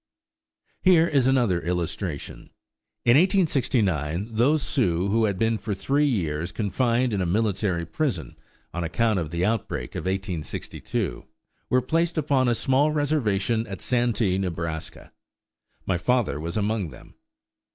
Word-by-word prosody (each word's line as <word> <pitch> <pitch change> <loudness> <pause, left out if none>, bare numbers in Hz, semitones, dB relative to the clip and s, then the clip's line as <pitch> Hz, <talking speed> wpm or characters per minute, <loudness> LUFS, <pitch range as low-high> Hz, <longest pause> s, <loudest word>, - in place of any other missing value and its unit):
Here 175 -3 +5
is 140 -5 +2
another 120 -10 +2
illustration: 85 -2 -4 0.6
In 120 - +6
1869 115 - +1
those 135 +7 +2
Sioux 95 - +1
who 110 +2 +3
had 100 -3 -1
been 115 +1 +1
for 105 -1 -3
three 140 +9 +1
years 85 - -1
confined 115 +4 0
in 100 - 0
a - - 0
military 100 -3 0
prison, 90 - -2 0.4
on 85 - -2
account 105 +5 +1
of 80 -3 -3
the 85 +2 -1
outbreak 110 0 -2
of - - -5
1862, 90 -9 -3 0.4
were 125 0 +3
placed 165 +1 0
upon 140 -4 +2
a 120 - +2
small 135 +5 +2
reservation 120 -7 0
at 95 -3 -6
Santee, 115 -6 +1
Nebraska. 85 -4 -4 0.7
My 90 -3 0
father 115 - +1
was 85 +5 -4
among 105 -3 0
them. - - -14
110 Hz, 135 wpm, -25 LUFS, 90-130 Hz, 0.7 s, In